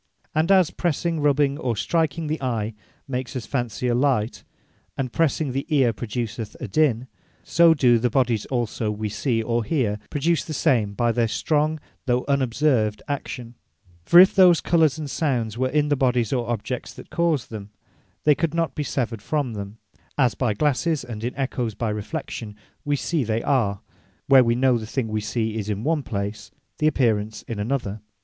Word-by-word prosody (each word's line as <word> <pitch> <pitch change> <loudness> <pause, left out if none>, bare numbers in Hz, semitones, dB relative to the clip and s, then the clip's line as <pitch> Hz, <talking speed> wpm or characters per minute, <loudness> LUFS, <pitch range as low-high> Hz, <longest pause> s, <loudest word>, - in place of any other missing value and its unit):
And 160 +4 +2
as 185 -4 +5
pressing, 170 0 -1
rubbing, 145 -1 +2
or 125 -6 -1
striking 160 +6 0
the 155 0 -3
Eye, 115 -4 -2 0.3
makes 130 -2 -4
us 125 - -4
fancy 125 -2 -2
a 120 - +2
light; 125 -3 0 0.5
and 130 -3 -3
pressing 155 -3 +1
the 135 +2 -3
Eare, 135 -7 +3
produceth 115 +1 -5
a - - -5
dinne; 135 -6 +2 0.4
so 165 0 +5
do 120 -5 +4
the 125 +2 +1
bodies 120 -3 +1
also 120 -3 -2
we 105 0 -3
see, 115 +2 -1
or 115 +1 0
hear, 110 -7 0
produce 160 +3 +1
the 155 - -6
same 105 -7 +1
by 120 +1 +2
their 115 0 +1
strong, 155 +6 0 0.3
though 125 0 +1
unobserved 130 -5 +1
action, 125 -4 -5 0.5
For 170 - +7
if 185 +1 +8
those 180 -4 +6
Colours, 160 -3 +2
and 155 -2 -5
Sounds, 125 -7 -1
were 130 +2 0
in 150 +1 +1
the 145 - +3
Bodies, 125 -4 +1
or 120 -3 -1
Objects 120 +2 -4
that - - -12
cause 165 -6 +1
them, 105 -2 -8 0.5
they 150 - +6
could 165 +3 -1
not 165 -5 0
bee 150 - -3
severed 120 -6 -2
from 145 -6 -1
them, 100 0 -7 0.4
as 125 -4 +3
by 120 -5 -1
glasses, 150 +3 +1
and 115 -3 -7
in 120 - -3
Ecchoes 125 -5 -2
by 110 0 -2
reflection, 105 -1 -5 0.3
wee 145 0 0
see 155 +1 -1
they 115 0 -1
are; 105 -8 +1 0.4
where 135 -2 +7
we 115 0 +2
know 125 -1 +3
the 110 - -7
thing 115 -1 -2
we 110 0 -1
see, 110 0 -2
is 105 0 -4
in 105 +1 -2
one 155 +1 +1
place; 105 -4 -4 0.3
the 155 - +3
apparence, 110 -7 0
in 115 -3 -6
another. 110 -2 -2
125 Hz, 185 wpm, -23 LUFS, 110-150 Hz, 0.5 s, if